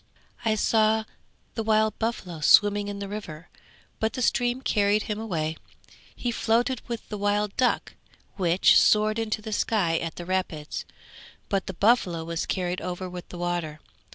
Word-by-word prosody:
I 220 Hz, -2 st, +2 dB
saw 220 Hz, 0 st, +3 dB, 0.5 s
the 225 Hz, -, -2 dB
wild 220 Hz, 0 st, +2 dB
buffalo 195 Hz, -7 st, -3 dB
swimming 205 Hz, +5 st, +5 dB
in 205 Hz, 0 st, -5 dB
the 200 Hz, 0 st, -5 dB
river, 180 Hz, -6 st, -7 dB, 0.5 s
but 220 Hz, 0 st, 0 dB
the 255 Hz, -, -2 dB
stream 245 Hz, +2 st, +1 dB
carried 210 Hz, -2 st, +2 dB
him 210 Hz, -1 st, -4 dB
away; 160 Hz, -7 st, -2 dB, 0.6 s
he 245 Hz, -, -2 dB
floated 235 Hz, +2 st, +1 dB
with 235 Hz, -2 st, -5 dB
the 210 Hz, -, -5 dB
wild 205 Hz, 0 st, 0 dB
duck, 255 Hz, -, +1 dB, 0.4 s
which 180 Hz, -1 st, +5 dB
soared 215 Hz, +1 st, +3 dB
into 215 Hz, -1 st, -2 dB
the 220 Hz, -, -5 dB
sky 190 Hz, -7 st, +1 dB
at 165 Hz, -1 st, -5 dB
the 175 Hz, -, -7 dB
rapids; 180 Hz, -5 st, -3 dB, 0.6 s
but 195 Hz, -2 st, -1 dB
the 190 Hz, -, -5 dB
buffalo 190 Hz, -6 st, +2 dB
was 165 Hz, 0 st, -3 dB
carried 180 Hz, -1 st, -2 dB
over 180 Hz, +1 st, -4 dB
with 180 Hz, -1 st, -8 dB
the 180 Hz, -, -8 dB
water. 175 Hz, -3 st, -3 dB
205 Hz, 160 wpm, -26 LUFS, 175-220 Hz, 0.6 s, swimming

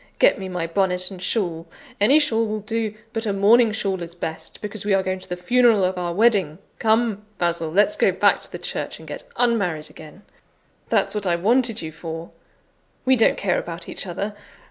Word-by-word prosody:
Get -, -, +4 dB
me 190 Hz, -1 st, -5 dB
my 180 Hz, -2 st, -2 dB
bonnet 185 Hz, +1 st, 0 dB
and 185 Hz, -2 st, -9 dB
shawl; 175 Hz, -5 st, -1 dB, 0.3 s
any 245 Hz, +9 st, +6 dB
shawl 230 Hz, -7 st, +2 dB
will 215 Hz, 0 st, -3 dB
do, 220 Hz, 0 st, -2 dB, 0.2 s
but 225 Hz, -1 st, -2 dB
a -, -, +1 dB
mourning 220 Hz, +4 st, +5 dB
shawl 195 Hz, -4 st, -2 dB
is 170 Hz, 0 st, -7 dB
best, 160 Hz, -2 st, -6 dB
because 210 Hz, -1 st, -5 dB
we 200 Hz, -1 st, +2 dB
are 190 Hz, -, +1 dB
going 185 Hz, 0 st, -2 dB
to 185 Hz, -, -13 dB
the 180 Hz, -, -3 dB
funeral 230 Hz, +2 st, +4 dB
of 185 Hz, +1 st, +1 dB
our 175 Hz, -1 st, -2 dB
wedding. 195 Hz, -6 st, +2 dB, 0.2 s
Come, 220 Hz, -2 st, +1 dB
Basil! 170 Hz, -2 st, 0 dB
let's 205 Hz, -, +3 dB
go -, -, +3 dB
back -, -, +3 dB
to -, -, -11 dB
the -, -, -5 dB
church, -, -, -4 dB
and -, -, -14 dB
get -, -, -6 dB, 0.2 s
unmarried 200 Hz, -11 st, 0 dB
again; 160 Hz, +5 st, -13 dB, 0.7 s
that's -, -, +2 dB
what 210 Hz, -2 st, -2 dB
I 175 Hz, -, +3 dB
wanted 225 Hz, +3 st, +1 dB
you 160 Hz, -, -5 dB
for. 165 Hz, +1 st, -7 dB, 0.7 s
We 260 Hz, 0 st, +5 dB
don't 225 Hz, -, +4 dB
care 190 Hz, -3 st, +1 dB
about 170 Hz, +1 st, -7 dB
each -, -, -6 dB
other. 200 Hz, +4 st, -4 dB
195 Hz, 205 wpm, -22 LUFS, 175-225 Hz, 0.7 s, any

